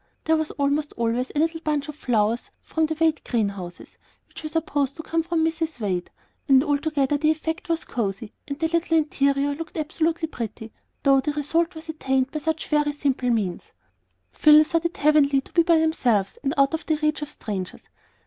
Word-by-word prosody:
There 320 - +3
was 315 -1 -1
almost 290 +1 0
always 235 +2 -1
a - - -7
little 325 +1 +1
bunch 300 -2 -1
of 300 - -6
flowers 230 -5 0
from 320 -1 0
the 315 - -2
Wade 320 -1 +2
greenhouses, 200 -6 -4 0.3
which - - -11
were 310 - -5
supposed 290 -4 -1
to 320 - -7
come 330 +1 0
from 325 -1 0
Mrs. 325 -3 -2
Wade; 185 -5 -2 0.4
and 270 -2 +6
altogether 290 -1 +1
the 305 +1 +2
effect 320 +3 -2
was 330 -1 -1
cosey, 210 -2 -3
and 280 -1 -4
the 325 +1 0
little 330 0 +1
interior 280 -2 +1
looked 330 +4 -7
absolutely 320 +1 -1
pretty, 225 -5 -7 0.3
though 275 -1 +5
the 290 +3 -1
result 325 +4 0
was 320 +1 -10
attained 265 -4 0
by 305 - -3
such 315 +1 -2
very 295 -1 +1
simple 270 -3 0
means. 205 -7 -2 0.6
Phil 305 0 +7
thought 330 +2 -1
it 340 - -2
heavenly 290 -2 +4
to 270 - -12
be 340 - +5
by 335 -1 +4
themselves 245 -11 +1
and 280 +2 -1
out 275 +2 +4
of 320 - -2
the 315 - +2
reach 305 0 0
of 295 - -4
strangers. 200 -10 -6
295 Hz, 195 wpm, -24 LUFS, 265-320 Hz, 0.6 s, Phil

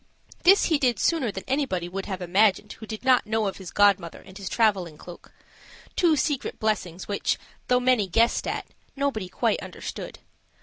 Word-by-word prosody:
This 390 +3 +6
he 315 -4 +2
did 250 -4 +2
sooner 295 -10 +1
than 190 - -7
anybody 260 -11 -1
would 190 +2 -5
have 190 -3 -4
imagined 200 +3 +2
who 220 - -11
did 220 +3 -7
not 255 -4 +4
know 220 0 0
of 195 - -3
his 190 -3 -8
godmother 195 -4 +2
and 190 - -15
his 195 -2 -6
traveling 195 -9 +1
cloak 175 +2 -12 0.6
two 335 -3 +4
secret 290 -1 -2
blessings, 190 -5 -2
which, 200 - 0 0.3
though 250 0 +3
many 250 -5 +2
guessed 230 +6 +2
at, - - -3 0.3
nobody 270 -9 -2
quite - - 0
understood. - - -7
215 Hz, 175 wpm, -25 LUFS, 190-255 Hz, 0.6 s, This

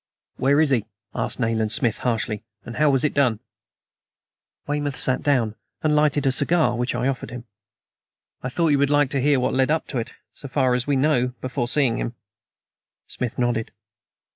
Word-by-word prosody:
"Where 140 +2 +3
is 155 -3 +3
he?" 115 -5 +1 0.3
asked 115 +2 -3
Nayland 115 -2 0
Smith 120 -3 +2
harshly. 115 -3 -2 0.3
"How 150 +4 +3
was 135 -2 +2
it 150 - +1
done?" 125 -7 +2 1.3
Weymouth 145 -1 -2
sat 130 - +3
down 125 -7 +1 0.3
and 150 -1 +2
lighted 150 -1 +2
a 135 - +4
cigar 145 0 +2
which 120 +1 -1
I 125 +2 0
offered 135 -2 -3
him. 125 -1 -8 1.0
"I 125 - -3
thought 165 +5 +1
you 145 -2 +3
would 140 0 +2
like 145 -2 +2
to 140 - 0
hear 140 0 +3
what 125 - 0
led 130 +1 +2
up 160 +1 +1
to 130 - -2
it 115 - -5 0.2
so 140 - -9
far 130 -2 +1
as 125 +1 -1
we 145 - +2
know 130 -3 +1
before 125 -1 -3
seeing 130 -3 +1
him?" 120 - -4 0.9
Smith 125 -2 -5
nodded. 120 -2 0
130 Hz, 185 wpm, -23 LUFS, 120-145 Hz, 1.3 s, a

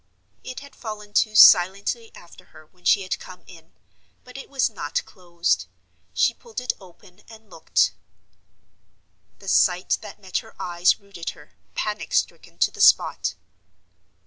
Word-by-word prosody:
It 255 - -7
had 280 -1 -14
fallen 210 -2 -8
to 215 0 +2
silently 200 +5 +6
after 175 - -16
her 155 0 -17
when 180 +3 -30
she 200 - +4
had 185 - -3
come 180 -1 -12
in, 165 -2 -16 0.5
but 250 - -15
it 270 - -9
was 270 -2 +1
not 165 -9 -4
closed. 175 -2 -2 0.4
She - - +2
pulled 470 -2 -8
it 250 - -2
open, 180 -1 -18
and 220 -1 -16
looked. - - +1 1.5
The 195 - -15
sight 180 -1 +2
that - - -11
met 190 -3 -3
her - - -16
eyes 175 0 +2
rooted 200 -4 -8
her, 145 - -18 0.2
panic 210 - -3
stricken, - - -1
to - - +2
the - - -7
spot. - - +4
195 Hz, 150 wpm, -23 LUFS, 175-220 Hz, 1.5 s, silently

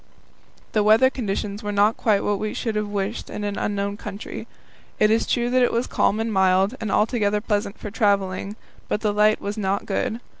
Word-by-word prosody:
The 215 - +2
weather 220 +5 +5
conditions 205 -3 -3
were 205 - -3
not 205 +2 +3
quite 210 -3 +1
what 205 -1 0
we 215 0 -3
should 225 - -2
have 210 0 -1
wished 205 +1 -3
in 210 - -5
an 205 -1 -2
unknown 200 0 -2
country. 205 0 -7 0.5
It 215 0 +4
is 225 - +2
true 240 0 0
that 255 0 +3
it 245 - +3
was 235 +2 0
calm 210 - +1
and 225 0 -1
mild, 190 +2 +3
and 215 -3 -2
altogether 210 -2 +2
pleasant 205 -1 -2
for 210 - -7
travelling, 200 -2 0 0.3
but 210 - -1
the 210 -2 +1
light 210 +1 +3
was 205 +2 -4
not 195 0 -1
good. 215 +3 -2
210 Hz, 200 wpm, -23 LUFS, 200-220 Hz, 0.5 s, weather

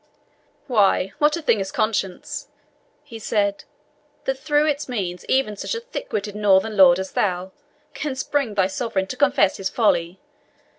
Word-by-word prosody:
"Why 200 -6 +2
what 300 +2 +3
a 335 - -7
thing 225 - +3
is 195 -1 -3
conscience," 200 -4 -2 0.6
he 235 -6 -10
said, 200 -2 -1 0.6
"that 265 0 -1
through 295 +1 +2
its 295 -2 -1
means 185 -7 -3
even 260 -6 +1
such 205 - -4
a - - -2
thick - - -7
witted 205 0 -3
northern 210 +1 +3
lord 180 -3 +7
as 190 0 -5
thou 185 -1 -1 0.4
canst 270 -3 -4
bring 275 -8 0
thy 195 -2 +3
sovereign 195 -1 -2
to 255 - -6
confess 270 -6 +3
his 195 -1 -2
folly! 180 -6 +1
210 Hz, 160 wpm, -22 LUFS, 190-270 Hz, 0.6 s, lord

